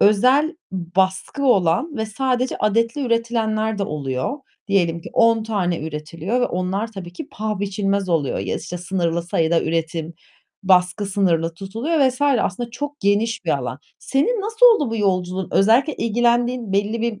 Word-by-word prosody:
özel 260 Hz, -, +4 dB, 0.2 s
baskı 190 Hz, -, -1 dB
olan 245 Hz, -, +2 dB
ve 220 Hz, -1 st, -2 dB
sadece 255 Hz, +3 st, -1 dB
adetli 230 Hz, +5 st, +1 dB
üretilenler 220 Hz, -2 st, 0 dB
de -, -, -1 dB
oluyor. 140 Hz, -, -3 dB, 0.3 s
Diyelim 170 Hz, -4 st, +1 dB
ki 240 Hz, -, -10 dB
10 230 Hz, -2 st, +4 dB
tane 195 Hz, -6 st, -1 dB
üretiliyor 160 Hz, +8 st, -3 dB
ve 245 Hz, -, +2 dB
onlar 190 Hz, +5 st, -2 dB
tabii 180 Hz, -4 st, -8 dB
ki 180 Hz, -, -8 dB
paha 215 Hz, -2 st, -4 dB
biçilmez 200 Hz, -1 st, -1 dB
oluyor 160 Hz, -6 st, 0 dB
ya, 95 Hz, -1 st, -2 dB
işte, 180 Hz, -, -6 dB
sınırlı 170 Hz, -2 st, -1 dB
sayıda 165 Hz, -1 st, +1 dB
üretim, 165 Hz, 0 st, -2 dB, 0.5 s
baskı 185 Hz, +1 st, +3 dB
sınırlı 170 Hz, -4 st, +1 dB
tutuluyor 225 Hz, -, -2 dB
vs. 255 Hz, +2 st, -5 dB
aslında 240 Hz, -5 st, +1 dB
çok 290 Hz, +4 st, -6 dB
geniş 205 Hz, +2 st, +1 dB
bir 165 Hz, -, 0 dB
alan. 125 Hz, 0 st, -5 dB, 0.2 s
Senin 320 Hz, -, 0 dB
nasıl 440 Hz, +4 st, +4 dB
oldu 435 Hz, -, +4 dB
bu 230 Hz, -, -2 dB
yolculuğun? 185 Hz, -2 st, -1 dB
Özellikle 235 Hz, +9 st, +4 dB
ilgilendiğin 240 Hz, 0 st, +1 dB
belli 205 Hz, +3 st, 0 dB
bir 230 Hz, -3 st, -2 dB
205 Hz, 155 wpm, -21 LUFS, 180-240 Hz, 0.5 s, özel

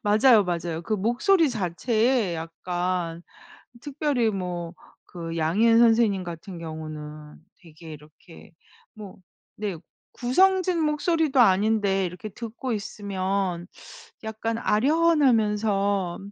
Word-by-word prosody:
맞아요, 215 Hz, +2 st, +5 dB
맞아요. 170 Hz, -2 st, -3 dB
그 215 Hz, -, -5 dB
목소리 245 Hz, -, +2 dB
자체에 220 Hz, +1 st, 0 dB
약간 170 Hz, +1 st, -3 dB, 0.6 s
특별히 285 Hz, -5 st, 0 dB
뭐 180 Hz, -4 st, -4 dB, 0.4 s
그 165 Hz, 0 st, -5 dB
양희은 215 Hz, +9 st, +3 dB
선생님 225 Hz, -5 st, +3 dB
같은 175 Hz, +2 st, -8 dB
경우는 155 Hz, -2 st, -8 dB, 0.2 s
되게 160 Hz, -1 st, -12 dB
이렇게 150 Hz, +3 st, -16 dB, 0.4 s
뭐 210 Hz, -4 st, -11 dB, 0.4 s
네. 205 Hz, -5 st, -4 dB, 0.3 s
구성진 365 Hz, +6 st, +2 dB
목소리도 300 Hz, -1 st, +1 dB
아닌데 200 Hz, -2 st, +3 dB
이렇게 180 Hz, +4 st, -7 dB
듣고 235 Hz, +4 st, -6 dB
있으면 195 Hz, -4 st, -3 dB, 0.6 s
약간 220 Hz, +1 st, -3 dB
아련하면서 215 Hz, -, +2 dB
205 Hz, 230 characters per minute, -25 LUFS, 175-235 Hz, 0.6 s, 맞아요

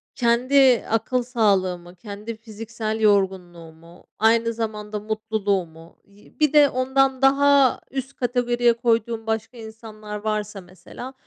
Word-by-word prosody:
kendi 250 Hz, +1 st, +3 dB
akıl 225 Hz, +3 st, 0 dB
sağlığımı, 185 Hz, -7 st, 0 dB
kendi 210 Hz, +4 st, -8 dB
fiziksel 220 Hz, 0 st, -6 dB
yorgunluğumu, 175 Hz, -5 st, -2 dB
aynı 230 Hz, +1 st, +2 dB
zamanda 215 Hz, -2 st, -5 dB
mutluluğumu 200 Hz, -6 st, -4 dB
yi 200 Hz, +1 st, -23 dB
bir 305 Hz, -1 st, +2 dB
de 290 Hz, -1 st, +6 dB
ondan 265 Hz, +1 st, 0 dB
daha 275 Hz, 0 st, +4 dB
üst 270 Hz, 0 st, -5 dB
kategoriye 245 Hz, -1 st, +1 dB
koyduğum 230 Hz, -1 st, -1 dB
başka 225 Hz, +2 st, -3 dB
insanlar 220 Hz, -1 st, -9 dB
varsa 210 Hz, -2 st, -3 dB
mesela 185 Hz, +8 st, -11 dB
220 Hz, 110 wpm, -22 LUFS, 205-245 Hz, -, de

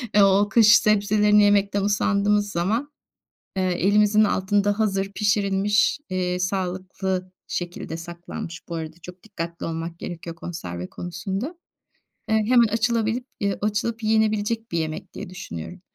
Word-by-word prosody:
eee, 205 Hz, -, +7 dB
o 200 Hz, +1 st, +4 dB
kış 225 Hz, 0 st, +7 dB
sebzelerini 210 Hz, -1 st, +4 dB
yemekten 200 Hz, 0 st, +3 dB
usandığımız 205 Hz, 0 st, +2 dB
zaman, 220 Hz, +12 st, -1 dB, 0.7 s
eee, 190 Hz, -, +1 dB
elimizin 205 Hz, +4 st, +3 dB
altında 205 Hz, +1 st, +1 dB
hazır 195 Hz, -2 st, 0 dB
pişirilmiş, 205 Hz, +2 st, +2 dB
eee, 180 Hz, -1 st, -1 dB
sağlıklı 185 Hz, 0 st, -2 dB, 0.2 s
şekilde 175 Hz, -2 st, -4 dB
saklanmış, 170 Hz, 0 st, -8 dB
bu 170 Hz, -, -5 dB
arada 160 Hz, 0 st, -5 dB
çok 180 Hz, 0 st, -11 dB
dikkatli 170 Hz, -6 st, -6 dB
olmak 165 Hz, +1 st, -5 dB
gerekiyor 170 Hz, -1 st, -7 dB
konserve 90 Hz, -, -6 dB
konusunda, 195 Hz, -, -4 dB, 0.8 s
eee, 220 Hz, -, +3 dB
hemen 240 Hz, -2 st, +5 dB
açılabilip 230 Hz, +2 st, 0 dB, 0.2 s
yı 200 Hz, -1 st, 0 dB
açılıp 220 Hz, +2 st, -1 dB
yenebilecek 220 Hz, 0 st, +1 dB
bir 170 Hz, -, -1 dB
yemek 155 Hz, -1 st, -5 dB
diye -, -, -7 dB
düşünüyorum. 180 Hz, -, -8 dB
200 Hz, 130 wpm, -24 LUFS, 180-210 Hz, 0.8 s, eee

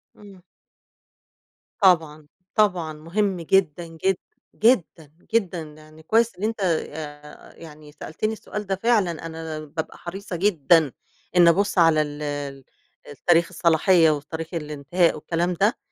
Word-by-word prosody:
إمم. 200 Hz, -3 st, -15 dB, 1.4 s
طبعًا، 160 Hz, -5 st, +3 dB, 0.3 s
طبعًا 180 Hz, -7 st, +1 dB
مهم 180 Hz, +4 st, -2 dB
جدًا، 170 Hz, -1 st, +1 dB
جداً، 175 Hz, +3 st, -1 dB, 0.4 s
جدًا، 180 Hz, -, +1 dB, 0.2 s
جدًا، 190 Hz, -6 st, +1 dB
يعني 155 Hz, 0 st, -14 dB
كويس 225 Hz, +2 st, +2 dB
إن 200 Hz, -, -8 dB
أنت 225 Hz, 0 st, -1 dB
آآ، 150 Hz, -4 st, -4 dB
يعني 150 Hz, -2 st, -13 dB
سألتني 160 Hz, +8 st, -4 dB
السؤال 210 Hz, -1 st, -6 dB
ده 195 Hz, -, 0 dB
فعلًا، 195 Hz, -7 st, 0 dB
أنا 160 Hz, -1 st, -6 dB
بابقى 155 Hz, +1 st, -6 dB
حريصة 195 Hz, +1 st, -7 dB
جدًا 165 Hz, -5 st, +3 dB, 0.4 s
إني 175 Hz, -1 st, +7 dB
أبُصّ 200 Hz, +4 st, +1 dB
على 165 Hz, -3 st, +5 dB
ال 145 Hz, 0 st, -5 dB, 0.9 s
ال 145 Hz, -, -10 dB
تاريخ 170 Hz, -1 st, +5 dB
الصلاحية 170 Hz, 0 st, +4 dB
وتاريخ 160 Hz, +3 st, -5 dB
الإنتهاء 155 Hz, +2 st, 0 dB
والكلام 170 Hz, +3 st, -1 dB
ده، 205 Hz, +9 st, +1 dB
170 Hz, 125 wpm, -23 LUFS, 155-195 Hz, 1.4 s, إني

